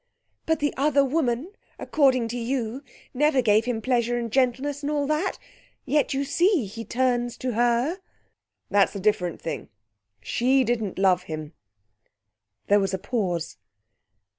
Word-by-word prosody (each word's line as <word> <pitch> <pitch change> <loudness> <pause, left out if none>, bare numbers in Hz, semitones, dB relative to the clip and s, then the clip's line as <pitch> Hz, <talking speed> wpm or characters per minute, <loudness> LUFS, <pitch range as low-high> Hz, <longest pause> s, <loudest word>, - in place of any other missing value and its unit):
"But 320 -2 +1
the 290 - +1
other 280 0 +3
woman, 275 +2 -1 0.3
according 260 -5 +2
to 240 - -4
you, 240 +1 -2 0.3
never 290 +1 +2
gave 220 -2 +3
him 235 -3 -2
pleasure 240 -2 +1
and 235 -2 -3
gentleness 265 +3 0
and 290 +1 -2
all 290 -1 0
that 305 +6 -1 0.5
yet 285 +1 +1
you 275 +1 0
see 345 - +2
he 215 +4 -7
turns 245 0 0
to 255 - -2
her." 240 - +1 0.7
"That's 205 +1 +3
a - - -3
different 185 -4 0
thing. 160 -7 -5 0.5
She 255 - +2
didn't 225 -5 -2
love 185 -2 +3
him." 155 0 -6 1.1
There 205 +1 +4
was 195 -1 0
a - - -3
pause. 185 - -2
245 Hz, 145 wpm, -25 LUFS, 210-275 Hz, 1.1 s, There